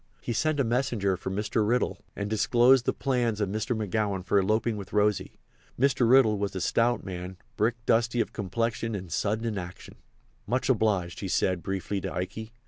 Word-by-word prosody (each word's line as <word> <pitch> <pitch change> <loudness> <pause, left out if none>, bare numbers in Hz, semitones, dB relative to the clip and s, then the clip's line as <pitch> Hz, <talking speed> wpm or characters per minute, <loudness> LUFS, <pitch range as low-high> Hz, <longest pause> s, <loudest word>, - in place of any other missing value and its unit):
He 120 - -3
sent 155 +4 0
a - - +4
messenger 115 -5 0
for 95 - -5
Mr. 105 +3 0
Riddle 120 +4 0
and 100 - -3
disclosed 120 +4 +4
the - - +2
plans 120 -5 -1
of 105 -2 0
Mr. 110 +3 -2
McGowan 105 -3 -1
for 100 +1 +3
eloping 110 +3 +1
with 100 -2 -8
Rosy. 105 -1 +1 0.4
Mr. 135 -3 +3
Riddle 120 -5 +5
was 100 -1 -2
a - - -2
stout 120 +5 +1
man, 90 -1 -6 0.2
brick 115 +2 +1
dusty 115 +1 +2
of - - -1
complexion 115 +2 -2
and 95 -4 -7
sudden 110 +6 -1
in 110 -3 -2
action. 90 0 -9 0.5
"Much 125 +3 0
obliged," 100 -7 +1
he 100 - -4
said, 90 -1 +1
briefly, 95 +1 -3
to - - -4
Ikey. 110 +5 -5
110 Hz, 185 wpm, -27 LUFS, 95-120 Hz, 0.5 s, Riddle